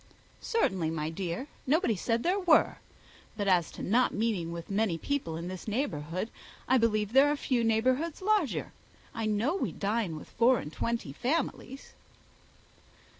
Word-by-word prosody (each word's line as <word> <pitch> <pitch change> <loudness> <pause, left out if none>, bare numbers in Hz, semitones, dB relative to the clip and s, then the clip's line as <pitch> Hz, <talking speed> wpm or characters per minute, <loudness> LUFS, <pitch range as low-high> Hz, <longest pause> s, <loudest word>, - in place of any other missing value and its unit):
"Certainly, 190 - 0
my 160 -1 -2
dear, 175 +6 -3 0.2
nobody 295 - +3
said 230 +5 -1
there 370 +3 +2
were; 350 -5 +4 0.6
but 205 -2 -1
as 180 -4 +3
to - - -7
not 245 +6 +2
meeting 210 -7 -1
with 170 +2 -7
many 195 -4 +1
people 215 - -2
in 170 +1 -5
this 185 +2 -7
neighbourhood, 185 - -2 0.4
I 260 0 +4
believe 215 -2 +1
there 275 +2 +6
are - - +1
few 255 -4 0
neighbourhoods 255 +8 +1
larger. 395 - 0 0.4
I 225 -1 -2
know 220 - +1
we 390 - -1
dine 205 -4 -1
with 155 - -9
four 240 +2 +4
and 150 -5 -6
twenty 230 -12 -2
families." 270 - -3
225 Hz, 155 wpm, -30 LUFS, 180-265 Hz, 0.6 s, there